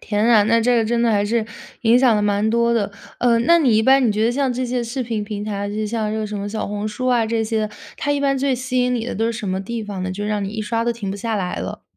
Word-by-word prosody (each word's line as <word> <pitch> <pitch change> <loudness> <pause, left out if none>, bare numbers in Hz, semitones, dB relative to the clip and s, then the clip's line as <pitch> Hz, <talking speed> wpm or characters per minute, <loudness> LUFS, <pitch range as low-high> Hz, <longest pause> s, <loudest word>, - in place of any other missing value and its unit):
天 210 0 -1
啊， 225 -3 +6
那 230 +1 +3
这 245 +1 +3
个 225 - +2
真 235 +1 0
的 235 - +3
还 205 -1 +2
是 225 +1 0 0.4
影 235 +2 +5
响 250 -4 +4
了 210 - 0
蛮 205 +1 +1
多 235 +1 +2
的， 210 -3 0 0.3
呃， 235 -1 +3
那 340 +7 +5
你 250 -8 +3
一 220 - +3
般 265 +1 +5
你 - - +2
觉 215 +2 0
得 235 - +2
像 270 +1 0
这 255 +1 -2
些 245 0 -1
视 240 +3 -3
频 225 -3 -3
平 205 0 -5
台， 205 -1 -3
就 205 - -5
是 215 0 -2
像 215 -1 -2
这 220 - -2
个 215 - -2
什 210 - -5
么 200 +1 -4
小 215 +1 -3
红 205 +1 -3
书 255 +4 -4
啊 240 -3 +3
这 225 0 0
些 220 0 -1
的， - - -12 0.3
它 290 - -2
一 285 - 0
般 275 -1 +1
最 270 0 +1
吸 255 0 -1
引 250 0 +1
你 230 - -2
的 - - -4
都 225 +2 0
是 230 - 0
什 215 -3 -5
么 190 +1 -1
地 230 +3 -4
方 200 -3 -5
呢？ 185 - -3
就 205 +2 -4
让 210 -1 -1
你 - - -3
一 220 +1 -5
刷 230 +2 -1
都 235 - +1
停 210 -4 -5
不 200 - -4
下 225 +2 -3
来 185 -3 -2
了。 - - -6
225 Hz, 350 characters per minute, -20 LUFS, 210-240 Hz, 0.4 s, 啊